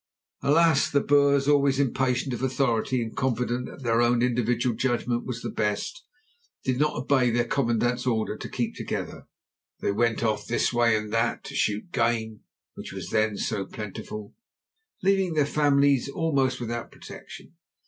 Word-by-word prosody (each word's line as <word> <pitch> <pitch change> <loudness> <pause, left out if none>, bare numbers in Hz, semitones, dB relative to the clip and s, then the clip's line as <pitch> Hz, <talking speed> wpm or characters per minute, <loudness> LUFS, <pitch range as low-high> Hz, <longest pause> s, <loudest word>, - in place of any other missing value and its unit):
Alas! 165 +3 +4
the 140 - +3
Boers, 140 -1 +3
always 140 -2 +3
impatient 130 -1 0
of 120 - -4
authority 130 -2 0
and 110 - -7
confident 125 -1 -1
that 140 - -11
their 115 -1 +2
own 120 0 +3
individual 120 0 +1
judgment 120 0 -1
was 120 -2 -5
the - - -3
best, 105 - -2 0.6
did 130 -1 0
not 150 0 +1
obey 130 -1 +2
their 120 +1 +1
commandant's 120 0 0
order 110 -3 0
to - - -8
keep - - -2
together. - - -5 0.5
They - - 0
went 115 +3 +1
off 110 -2 -1
this 120 - 0
way 120 -2 +3
and 105 0 -5
that, 115 +1 0
to - - -8
shoot 105 0 0
the 130 - -3
game 115 -2 0 0.3
which - - -8
was - - -7
then 110 -1 +1
so 100 -3 -2
plentiful, 105 0 -7 0.7
leaving 190 -3 +2
their 150 -2 +3
families 140 -2 +2
almost 135 -5 0
without 120 -1 -4
protection. - - -12
125 Hz, 160 wpm, -26 LUFS, 115-140 Hz, 0.7 s, Alas